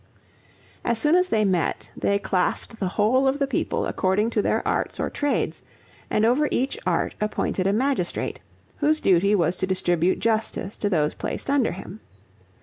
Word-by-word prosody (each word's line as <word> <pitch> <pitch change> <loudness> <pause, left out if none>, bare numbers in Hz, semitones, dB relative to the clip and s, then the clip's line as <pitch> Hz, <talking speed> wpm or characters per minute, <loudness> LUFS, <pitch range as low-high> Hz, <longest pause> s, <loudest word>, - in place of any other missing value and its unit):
As 235 -1 0
soon 300 +7 +2
as 365 0 +3
they 215 -1 +2
met, 180 -5 -1
they 200 - +1
classed 200 +3 -1
the 190 - 0
whole 225 +8 +2
of 265 +1 +2
the 280 - +1
people 275 - -1
according 205 +4 +1
to 215 - +1
their - - 0
arts - - -1
or - - -1
trades, 290 -1 -1 0.5
and 215 - +2
over 265 +6 +3
each 265 +7 0
art - - 0
appointed 205 -3 -1
a - - +3
magistrate, 230 -4 -1 0.4
whose 310 +1 +2
duty 195 - +3
was 175 -2 +1
to 190 - -1
distribute 180 -2 +1
justice 220 -3 -1
to 205 - 0
those 155 -5 +1
placed - - -4
under 280 -4 +2
him. 190 +3 -9
210 Hz, 170 wpm, -24 LUFS, 190-265 Hz, 0.5 s, as